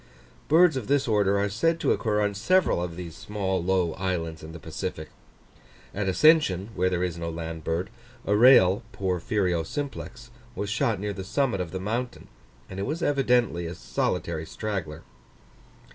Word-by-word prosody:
Birds 165 0 +5
of 130 -5 -4
this 140 -1 +2
order 100 -3 +2
are 100 - +1
said 165 +12 0
to - - +1
occur 105 -2 +1
on 105 0 +1
several 125 - +2
of 85 -1 -4
the 90 -1 -7
small 95 0 -3
low 90 -3 +1
islands 85 -4 -3
in 80 - -9
the 85 - -8
Pacific. 80 0 -6 0.8
At 100 -1 -1
Ascension, 105 - +4
where 95 0 +1
there 90 -1 -1
is 85 -2 -3
no 85 0 -3
land 80 -1 -6
bird, 85 +4 -2 0.3
a 105 - +2
rail 105 -5 +6
(Porphyrio 90 -1 0
simplex) 125 - -6 0.2
was 100 0 -3
shot 110 -2 0
near 105 +1 -3
the 95 -1 -6
summit 120 -1 0
of 90 - -4
the 95 - -5
mountain, 115 +6 -4 0.4
and 95 - -7
it 100 - -2
was 160 +4 -3
evidently 125 - +2
a 85 - -6
solitary 80 +4 -2
straggler. 85 -7 -5
95 Hz, 170 wpm, -26 LUFS, 85-115 Hz, 0.8 s, rail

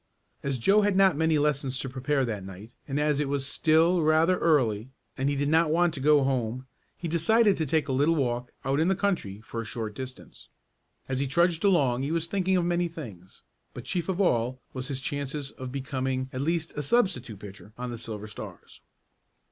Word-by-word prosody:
As 140 -2 -2
Joe 195 - +4
had 205 -1 +2
not 190 -4 +5
many 160 +1 +2
lessons 140 -3 0
to 135 - -3
prepare 135 +1 0
that 105 -5 -4
night, 95 +5 -10
and 140 0 -1
as 150 -1 +1
it 145 -2 -1
was 140 -1 -1
still 165 +5 +3
rather 160 +3 +3
early 125 -8 +2 0.3
and 135 +1 0
he 145 - 0
did 140 +1 0
not 160 +1 +3
want 170 +1 +2
to 145 - -6
go 145 +1 +4
home, 130 -1 -1 0.3
he 170 - -4
decided 200 +6 +3
to 160 - -1
take 155 +3 +1
a - - -2
little 145 +5 +3
walk 125 -4 -1
out 135 +2 +1
in 160 - +3
the 190 - +3
country 170 - -2
for 115 +1 -5
a - - -5
short 110 -1 -5
distance. 130 +3 -10 0.6
As 130 -1 -2
he 140 - 0
trudged 170 +4 +2
along 140 -11 +3
he 140 +3 -2
was 165 0 0
thinking 190 +1 +1
of 175 - +1
many 175 0 +1
things, 110 - -10 0.3
but 125 - -7
chief 175 +7 -2
of 190 0 -1
all 125 - +1
was 130 0 -5
his 135 -2 -3
chances 140 +1 -4
for 130 - -6
becoming 130 0 -3
at 130 - -3
least 165 +2 -1
a 150 - -2
substitute 145 - 0
pitcher 100 +1 -11
on 125 0 -4
the 120 - -5
Silver 110 -2 -6
Stars. 105 - -10
140 Hz, 210 wpm, -27 LUFS, 125-165 Hz, 0.6 s, not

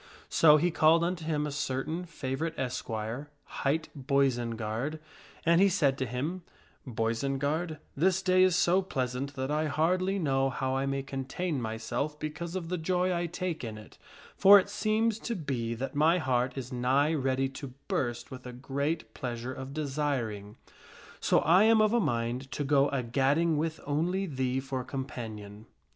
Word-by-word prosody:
So 155 -2 +6
he 175 +3 +1
called 160 +1 +4
unto 175 -1 -2
him 150 -2 0
a 150 - -3
certain 145 +4 -2
favorite 155 0 -4
esquire, 125 +1 -4
hight 155 +4 -1
Boisenard, 130 -1 0 0.5
and 170 +2 +5
he 200 - +6
said 145 -7 +2
to 130 - -1
him, 150 +10 -3 0.3
" - - -32
Boisenard, 135 +8 -1 0.2
this 185 +5 +2
day 185 0 +4
is 185 -1 +5
so 180 +2 +3
pleasant 135 -4 -3
that 130 +1 -2
I 155 +1 +1
hardly 185 +6 +1
know 135 -6 +1
how 130 0 -2
I 135 +1 0
may 135 0 -1
contain 135 +3 -3
myself 115 +6 -3
because 155 +3 -5
of 170 -3 -4
the 180 -1 -2
joy 180 +2 +1
I 175 0 -1
take 175 -2 -4
in 110 -2 -5
it, 105 - -14 0.4
for 200 +1 +9
it 200 0 +1
seems 215 +1 +1
to 235 - -3
be 125 - -3
that 135 +4 -4
my 155 +4 +4
heart 130 -4 0
is 130 0 -5
nigh 135 +5 +2
ready 135 -2 +1
to 135 -1 -9
burst 120 -2 -2
with 130 -1 -8
a 125 - -7
great 140 +5 -3
pleasure 125 -1 -4
of 130 +1 -7
desiring. 135 -8 -2 0.6
So - - +3
I 180 +7 +5
am 225 0 +5
of 215 +1 +4
a 240 - +4
mind 120 - -1
to 145 - -2
go 140 0 +3
a 135 -2 -1
gadding 140 +7 +2
with 160 +1 -1
only 175 +7 0
thee 130 -5 -1
for 135 -1 -4
companion." 110 -6 -7
140 Hz, 170 wpm, -29 LUFS, 130-165 Hz, 0.6 s, for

